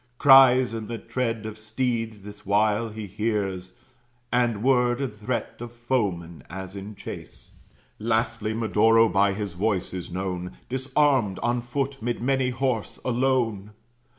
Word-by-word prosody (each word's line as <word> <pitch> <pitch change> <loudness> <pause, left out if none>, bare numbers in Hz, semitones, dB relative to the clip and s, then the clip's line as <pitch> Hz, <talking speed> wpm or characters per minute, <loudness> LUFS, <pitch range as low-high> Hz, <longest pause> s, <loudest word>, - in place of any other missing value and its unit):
Cries 130 -3 +7
and 110 -2 -5
the 115 - -4
tread 115 -1 -3
of 110 0 -7
steeds 115 -1 -2
this 105 0 -11
while 105 +3 +2
he 110 0 -7
hears, 100 -3 -2 0.6
And 120 -3 +1
word 125 -2 +3
and 135 -6 -3
threat 110 +2 -4
of 120 0 -7
foeman, 100 - -2
as 95 +1 -7
in 100 +2 -7
chase; - - -9 0.5
Lastly 110 -1 -1
Medoro 115 +1 +4
by 100 0 +3
his 100 -2 -4
voice 95 +1 -1
is 90 -2 -5
known, 90 0 -4
Disarmed, 130 -5 +1
on 120 0 +1
foot, 135 +2 -3
'mid 120 +1 -2
many 130 +1 +1
horse, 125 -3 -2
alone. 120 -5 0
115 Hz, 140 wpm, -25 LUFS, 100-125 Hz, 0.6 s, Cries